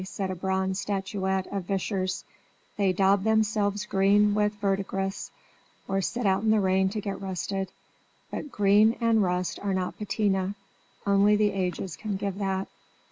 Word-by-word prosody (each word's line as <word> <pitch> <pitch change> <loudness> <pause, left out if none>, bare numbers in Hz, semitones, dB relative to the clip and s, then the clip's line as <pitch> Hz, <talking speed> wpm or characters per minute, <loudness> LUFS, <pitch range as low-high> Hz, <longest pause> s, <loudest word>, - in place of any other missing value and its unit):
said 190 0 -4
a - - -3
bronze 190 +1 -1
statuette 190 -1 -1
of 195 -3 -3
Vischer's 190 0 -2 0.5
"They 200 -2 +2
daub 195 +1 +3
themselves 210 -1 +1
green 205 +1 +3
with 210 0 +1
verdigris, 195 -1 -2 0.6
or 195 0 0
sit 235 +5 -2
out 190 -1 +3
in 220 - +1
the 215 0 +4
rain 190 0 +2
to 210 +2 -4
get 200 -1 -4
rusted; 190 0 -3 0.6
but 295 - -5
green 210 +2 +4
and 230 -2 +3
rust 180 -1 -1
are 200 -1 -1
not 185 -1 -3
patina; 200 -2 0 0.5
only 200 +1 +4
the 210 0 +3
ages 185 -2 -3
can 215 -2 -4
give 200 0 -3
that!" 195 -1 -1
195 Hz, 155 wpm, -27 LUFS, 190-210 Hz, 0.6 s, the